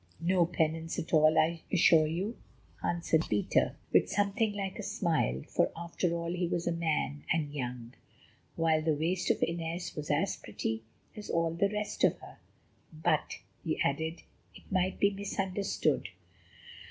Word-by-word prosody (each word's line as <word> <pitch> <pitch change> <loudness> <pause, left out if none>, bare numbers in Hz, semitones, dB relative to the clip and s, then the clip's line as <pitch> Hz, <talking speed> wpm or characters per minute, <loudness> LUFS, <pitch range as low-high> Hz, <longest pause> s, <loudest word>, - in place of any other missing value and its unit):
"No 175 0 +3
penance 165 -1 -1
at 160 - -4
all, 155 0 +6
I 165 +1 +3
assure 160 -2 +6
you," 185 +9 -2 0.5
answered 165 -2 +1
Peter 105 -1 +2 0.2
with - - +5
something 205 +2 +1
like 195 -2 -4
a - - -2
smile. 165 - 0
For - - +1
after 170 +1 -1
all 170 0 -2
he 180 -1 0
was 170 0 -1
a 175 - +1
man, 160 - -1
and 150 -3 0
young; 125 -3 -5 0.6
while 160 -1 +2
the 155 -1 +1
waist 175 +4 0
of - - +2
Inez 165 +1 -3
was 150 -1 -5
as - - +1
pretty 110 0 -4 0.3
as 210 -1 -8
all 165 0 +1
the 200 +4 +2
rest 210 0 -3
of - - +4
her. - - -13 0.5
"But," 155 0 0 0.3
he - - -1
added, 160 +4 -1 0.3
"it - - -13
might 185 0 +1
be 200 - +4
misunderstood." 195 - -1
165 Hz, 155 wpm, -31 LUFS, 155-185 Hz, 0.6 s, all